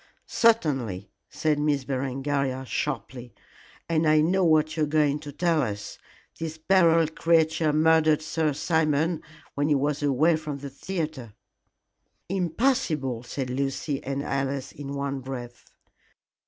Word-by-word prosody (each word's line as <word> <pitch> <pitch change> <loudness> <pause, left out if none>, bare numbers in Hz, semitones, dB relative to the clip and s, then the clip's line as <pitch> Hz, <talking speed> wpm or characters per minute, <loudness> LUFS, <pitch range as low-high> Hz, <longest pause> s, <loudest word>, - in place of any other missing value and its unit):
"Certainly," 135 - +1 0.2
said 155 -2 0
Miss 150 -2 +1
Berengaria, 135 0 -2
sharply, 125 -2 -4 0.5
"and 160 -1 +1
I 155 0 +5
know 180 +5 +2
what 155 -2 +3
you 160 - -2
are 150 - +2
going 150 -1 +2
to 150 -1 -8
tell 165 +1 +1
us. 105 -5 -5 0.4
This 160 -1 -4
Beryl 165 -1 +4
creature 160 -1 +2
murdered 155 0 +3
Sir 160 -1 0
Simon 160 +1 +1 0.3
when 145 +1 0
he 150 - +4
was 145 +1 0
away 145 +4 +3
from 155 -2 -5
the 140 0 -8
theatre." 150 - -5 1.0
"Impossible!" 175 - 0
said 125 +1 -5
Lucy 135 +2 -2
and 140 +1 -3
Alice 135 -1 -2
in 140 -1 -7
one 140 -1 -2
breath. 125 -2 -8
150 Hz, 130 wpm, -26 LUFS, 135-160 Hz, 1.0 s, I